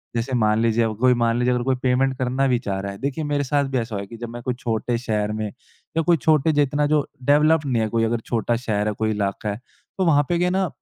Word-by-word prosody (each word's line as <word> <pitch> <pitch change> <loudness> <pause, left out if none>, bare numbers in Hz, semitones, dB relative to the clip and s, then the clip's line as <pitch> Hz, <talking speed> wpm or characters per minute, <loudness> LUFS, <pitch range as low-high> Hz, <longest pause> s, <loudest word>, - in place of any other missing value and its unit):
जैसे 120 +3 -2
मान 110 -2 +2
लीजिए 115 0 +2
अब 110 -1 -1
कोई 130 0 +5
मान 120 -1 +1
लीजिए 125 0 +2
अगर 125 0 -1
कोई 130 +1 +1
पेमेंट 130 +1 +2
करना 130 +1 0
भी 125 - +2
चाह 100 -4 -3
रहा 100 +1 -4
है 100 - -9
देखिए 140 +5 -3
मेरे 145 -1 0
साथ 140 +1 +1
भी 130 - 0
ऐसा 115 -2 -3
हुआ 100 - -2
है 100 - -8
कि 115 - -10
जब 120 0 -6
मैं 120 +1 -8
कोई 125 - -1
छोटे 115 +1 -1
शहर 105 -3 -1
में 110 0 -3
या 160 +9 -7
कोई 170 +1 +3
छोटे 155 0 +3
जितना 145 0 +1
जो 150 -1 +2 0.2
डेवलप 150 +3 +4
नहीं 125 -4 +1
है 110 - 0
कोई 115 +1 +1
अगर 115 +1 0
छोटा 120 0 0
शहर 105 -3 -1
है 105 - 0
कोई 110 +1 -1
इलाका 105 0 -2
है 100 - -3 0.4
तो 190 - +1
वहाँ 145 -3 +4
पे 175 - +2
क्या 180 +1 +1
है - - 0
ना 190 0 +1
125 Hz, 285 wpm, -22 LUFS, 110-145 Hz, 0.4 s, कोई